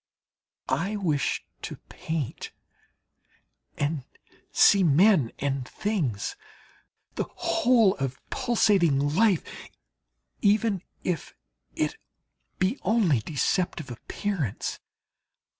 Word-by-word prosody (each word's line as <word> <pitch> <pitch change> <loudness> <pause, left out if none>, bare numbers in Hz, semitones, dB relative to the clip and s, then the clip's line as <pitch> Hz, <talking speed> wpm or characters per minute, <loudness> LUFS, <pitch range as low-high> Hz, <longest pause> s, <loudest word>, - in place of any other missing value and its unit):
I 195 +5 0
wish 160 -8 0 0.2
to - - -5
paint 160 -6 -4 1.2
and 145 -1 -1 0.5
see 200 - +6
men 170 - +4
and 135 -2 -2
things, 155 - -2 0.8
the - - -2
whole 230 -6 +3
of 135 -2 -3
pulsating 190 - +2
life, 200 -1 +3 1.0
even 205 -2 +2 0.2
if 180 -3 -3 0.4
it - - -1 0.6
be 190 +9 0
only 190 - +3
deceptive 155 - -1
appearance. 155 - -3
175 Hz, 80 wpm, -27 LUFS, 140-205 Hz, 1.2 s, see